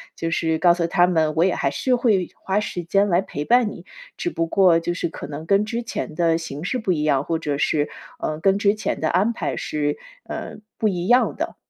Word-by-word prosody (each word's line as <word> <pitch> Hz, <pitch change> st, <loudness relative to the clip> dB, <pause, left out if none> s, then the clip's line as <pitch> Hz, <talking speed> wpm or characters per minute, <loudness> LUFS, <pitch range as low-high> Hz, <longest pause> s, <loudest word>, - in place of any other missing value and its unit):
就 165 Hz, -, -3 dB
是 160 Hz, -1 st, 0 dB
告 175 Hz, +1 st, +5 dB
诉 170 Hz, -1 st, 0 dB
他 175 Hz, +1 st, +3 dB
们 160 Hz, -3 st, +1 dB
我 165 Hz, -, +4 dB
也 185 Hz, -, +1 dB
还 140 Hz, -, 0 dB
是 255 Hz, -, +1 dB
会 215 Hz, -7 st, +1 dB
花 195 Hz, +2 st, -1 dB
时 180 Hz, -4 st, -4 dB
间 195 Hz, +4 st, +2 dB
来 175 Hz, 0 st, +3 dB
陪 145 Hz, -6 st, -5 dB
伴 240 Hz, 0 st, +3 dB
你， -, -, -11 dB, 0.3 s
只 350 Hz, -, -2 dB
不 165 Hz, -, -1 dB
过 175 Hz, -1 st, +4 dB
就 175 Hz, +1 st, -2 dB
是 175 Hz, -, -2 dB
可 -, -, -8 dB
能 150 Hz, +2 st, -7 dB
跟 200 Hz, +2 st, +3 dB
之 235 Hz, +2 st, -3 dB
前 230 Hz, -8 st, -5 dB
的 165 Hz, 0 st, +2 dB
形 155 Hz, -3 st, -6 dB
式 225 Hz, +8 st, -1 dB
不 210 Hz, -5 st, -1 dB
一 160 Hz, -4 st, 0 dB
样， 140 Hz, -3 st, +2 dB
或 165 Hz, +2 st, -2 dB
者 145 Hz, -3 st, -2 dB
是， 150 Hz, +1 st, +1 dB, 0.3 s
呃， 155 Hz, 0 st, -3 dB
跟 195 Hz, +3 st, +3 dB
之 205 Hz, 0 st, +3 dB
前 215 Hz, -, -3 dB
的 160 Hz, -, +1 dB
安 200 Hz, +7 st, +2 dB
排 -, -, -3 dB
是， 145 Hz, -1 st, -2 dB, 0.3 s
呃， -, -, -6 dB, 0.2 s
不 220 Hz, -, +1 dB
一 180 Hz, -3 st, -2 dB
样 245 Hz, +3 st, +4 dB
的。 -, -, -4 dB
175 Hz, 255 characters per minute, -22 LUFS, 160-200 Hz, 0.3 s, 告